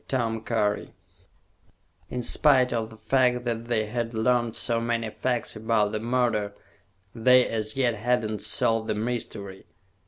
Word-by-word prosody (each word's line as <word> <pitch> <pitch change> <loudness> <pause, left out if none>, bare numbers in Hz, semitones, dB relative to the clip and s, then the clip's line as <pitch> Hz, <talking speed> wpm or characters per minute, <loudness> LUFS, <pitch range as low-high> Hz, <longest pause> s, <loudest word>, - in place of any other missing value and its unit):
In 125 -1 -4
spite 130 -1 +4
of 110 -2 -2
the 110 - -14
fact 125 +1 +1
that 115 -1 -2
they 115 -2 0
had 115 +1 -3
learned 120 0 +1
so 115 -2 0
many 115 -1 -1
facts 125 -1 -2
about 110 -1 +1
the 110 - -2
murder, 115 -3 0 0.6
they 125 +2 +5
as 110 -1 -3
yet 125 -3 +2
had 120 +2 0
not 105 -1 -4
solved 110 +1 +1
the - - -1
mystery. 105 -4 -5
115 Hz, 135 wpm, -26 LUFS, 110-125 Hz, 0.6 s, they